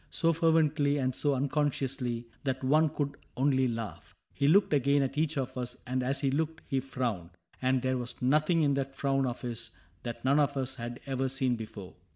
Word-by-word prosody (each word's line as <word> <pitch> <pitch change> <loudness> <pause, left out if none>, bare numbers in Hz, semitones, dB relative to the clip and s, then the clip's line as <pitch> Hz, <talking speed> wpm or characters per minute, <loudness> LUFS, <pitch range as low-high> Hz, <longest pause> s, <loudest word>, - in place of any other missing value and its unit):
So 165 0 +2
fervently 155 -3 +3
and 130 -2 0
so 145 +2 0
unconsciously, 135 -3 -1 0.2
That 130 -1 -2
one 155 +4 +4
could 140 -1 -3 0.2
only 130 -1 +3
laugh. 115 -3 -5 0.2
He 140 - +1
looked 195 +2 +5
again 140 0 +3
At 135 0 -3
each 155 0 0
of 130 -2 -2
us, 125 0 -4
and 130 +1 -1
as 135 +2 0
he 135 -2 +1
looked 160 +3 -1
he 135 - +1
frowned; 125 -10 -3 0.3
And 130 0 +2
there 130 0 +1
was 120 0 -4
something 155 +5 +3
in 140 -1 +3
that 135 0 -2
frown 135 -1 +1
of 120 - -4
his 120 -3 -3 0.3
That 120 0 -6
none 140 +3 +4
of 140 -1 +2
us 130 -1 -1
had 120 -1 -6
ever 135 -1 -1
seen 130 -2 +1
before. 105 -4 -8
135 Hz, 195 wpm, -30 LUFS, 125-145 Hz, 0.3 s, looked